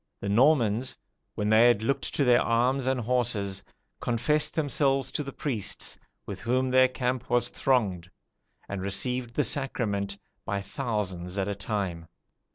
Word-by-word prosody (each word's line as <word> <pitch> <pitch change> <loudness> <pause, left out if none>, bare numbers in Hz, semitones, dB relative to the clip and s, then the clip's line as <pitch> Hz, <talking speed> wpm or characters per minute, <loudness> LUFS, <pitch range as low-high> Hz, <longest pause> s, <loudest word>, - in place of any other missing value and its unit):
The 100 - -4
Normans, 120 0 +3 0.4
when 105 0 -1
they 110 +2 +6
had 120 -3 +3
looked 140 +4 -1
to 145 - +2
their 125 -2 +5
arms 125 +3 +1
and 130 -1 +1
horses, 110 -5 -1 0.4
confessed 125 +6 +1
themselves 140 -2 +1
to - - -1
the 140 -1 -5
priests, 125 -8 -3 0.3
with - - -6
whom 130 +3 +1
their 130 0 +6
camp 125 -1 -2
was 120 0 +2
thronged, 100 -10 0 0.6
and 100 -1 -4
received 120 +5 -1
the 150 - +2
sacrament 105 -9 -2 0.3
by 100 - -2
thousands 100 -7 -3
at 95 0 0
a 100 - -1
time. 100 -5 -3
120 Hz, 150 wpm, -27 LUFS, 100-130 Hz, 0.6 s, they